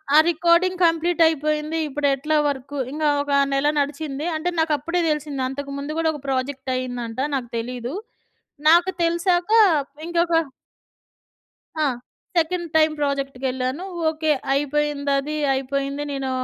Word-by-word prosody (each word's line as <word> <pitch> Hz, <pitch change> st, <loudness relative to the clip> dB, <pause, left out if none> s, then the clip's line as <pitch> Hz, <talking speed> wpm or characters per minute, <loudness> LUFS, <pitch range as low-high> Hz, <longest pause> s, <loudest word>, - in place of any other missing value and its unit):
ఆ -, -, +9 dB
recording 345 Hz, +2 st, +3 dB
complete 335 Hz, +1 st, +2 dB
అయిపోయింది. 305 Hz, 0 st, 0 dB
ఇప్పుడెట్లా 290 Hz, +1 st, 0 dB
work! 280 Hz, 0 st, -4 dB
ఇంక 305 Hz, +2 st, -4 dB, 0.2 s
ఒక 285 Hz, 0 st, -4 dB, 0.2 s
నెల 275 Hz, +1 st, +2 dB
నడిచింది. 290 Hz, 0 st, -3 dB
అంటే 315 Hz, +3 st, -1 dB
నాకప్పుడే 320 Hz, +2 st, 0 dB
తెలిసింది. 300 Hz, -3 st, -2 dB
అంతకు 280 Hz, +1 st, -6 dB
ముందు 290 Hz, +3 st, -4 dB
కూడా 325 Hz, -1 st, +2 dB
ఒక 295 Hz, -, -8 dB
ప్రాజెక్ట్ 265 Hz, 0 st, -2 dB
అయిందంట. 245 Hz, -2 st, -4 dB, 0.2 s
నాకు 250 Hz, -3 st, -3 dB
తెలీదు. 245 Hz, +2 st, -4 dB, 0.8 s
నాకు 345 Hz, +3 st, +5 dB
తెలిసాక 350 Hz, +2 st, +1 dB, 0.6 s
ఇంకొక 340 Hz, -1 st, +2 dB, 1.5 s
ఆ! -, -, +3 dB, 0.5 s
Second 340 Hz, +1 st, +1 dB
time 310 Hz, 0 st, +4 dB
ప్రాజెక్ట్‌కెళ్ళాను. 270 Hz, 0 st, -2 dB, 0.3 s
ఓకే. 315 Hz, 0 st, 0 dB, 0.2 s
అయిపోయిందది. 290 Hz, 0 st, 0 dB, 0.2 s
అయిపోయింది. 275 Hz, +2 st, -2 dB
నేను 270 Hz, -1 st, -3 dB
295 Hz, 115 wpm, -22 LUFS, 275-320 Hz, 1.5 s, ఆ